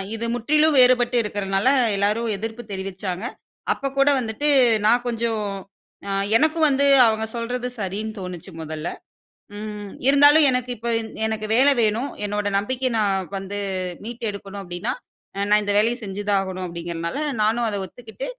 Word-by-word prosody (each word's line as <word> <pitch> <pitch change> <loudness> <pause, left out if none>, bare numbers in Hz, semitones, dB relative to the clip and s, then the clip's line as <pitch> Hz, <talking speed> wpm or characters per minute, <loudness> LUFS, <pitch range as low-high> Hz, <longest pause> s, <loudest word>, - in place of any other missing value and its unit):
இது 230 +1 -4
முற்றிலும் 300 +5 +2
வேறுபட்டு 250 -1 +4
இருக்கறதுனால 195 +1 -1 0.3
எல்லாரும் 210 +4 0
எதிர்ப்பு 225 +3 -5
தெரிவிச்சாங்க. 190 +1 -5 0.5
அப்பக் 275 0 -5
கூட 275 +1 +5
வந்துட்டு 235 +5 -2 0.4
நான் 240 +3 +4
கொஞ்சம் 230 -2 -1 0.7
அ - - -2 0.3
எனக்கும் 315 +2 +3
வந்து 280 +1 +2 0.2
அவங்க 220 0 0
சொல்றது 245 +1 -3
சரின்னு 210 +3 -4
தோணுச்சு 180 0 -7
மொதல்ல. 155 +1 -5 0.7
ம். 210 -2 -7 0.2
இருந்தாலும் 290 +2 +7
எனக்கு 250 -1 -1
இப்ப 235 +2 -4
இந் 220 - -7 0.2
எனக்கு 215 -1 -3
வேல 270 +3 +6
வேணும். 225 +6 0
என்னோட 205 0 -2
நம்பிக்கைய 255 +5 -1
நான் 195 -3 0
வந்து 195 +1 -5 0.4
மீட்டு 235 +2 -7
எடுக்கணும் 200 0 -8
அப்டின்னா 175 +5 -3 0.4
அ - - -2
நான் 210 0 +4
இந்த 205 0 -1
வேலைய 230 +3 +2
செஞ்சுதா 205 +1 -3
ஆகணும் 185 -1 -5
அப்டிங்கிறதுனால 170 - -5 0.2
நானும் 230 +2 +1
அத 205 - -3
ஒத்துக்கிட்டு. 240 - -9
220 Hz, 145 wpm, -22 LUFS, 195-245 Hz, 0.7 s, இருந்தாலும்